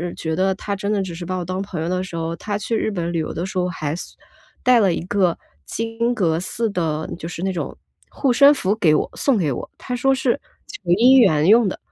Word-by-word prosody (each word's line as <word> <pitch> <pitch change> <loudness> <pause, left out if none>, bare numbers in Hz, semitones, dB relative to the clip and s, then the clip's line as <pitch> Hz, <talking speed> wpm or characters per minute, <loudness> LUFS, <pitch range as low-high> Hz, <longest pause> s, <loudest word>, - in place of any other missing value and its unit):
觉 160 -1 -3
得 190 +2 +1
他 200 +1 -4
真 200 +1 -4
的 200 - +1
只 180 - -6
是 175 +1 -7
把 185 +2 -3
我 180 - -3
当 185 +2 -3
朋 185 -5 -5
友 165 - -2
的 185 0 0
时 175 -2 -8
候， 165 0 -2
他 205 +3 -3
去 220 +2 -2
日 - - 0
本 175 -4 -3
旅 170 - -1
游 155 - -3
的 170 - -3
时 190 - -6
候 180 0 +1
还 155 -4 -3
送 - - -9 0.5
带 250 -2 +5
了 190 -5 +3
一 - - -3
个 185 -4 +1 0.3
金 230 +2 -2
阁 165 -6 +1
寺 225 +5 -2
的 160 -5 -2
就 165 - -6
是 170 - -7
那 190 - 0
种 180 - -5 0.3
护 270 -3 0
身 280 +4 +7
符 200 -7 0
给 155 -7 +4
我 - - -1
送 270 -6 +2
给 155 -7 0
我， - - -5
他 250 - -6
说 270 +2 +2
是 260 +1 0 0.3
求 415 - -9
姻 250 +8 +6
缘 160 -10 +4
用 225 +1 +6
的。 - - -3
190 Hz, 270 characters per minute, -21 LUFS, 170-225 Hz, 0.5 s, 身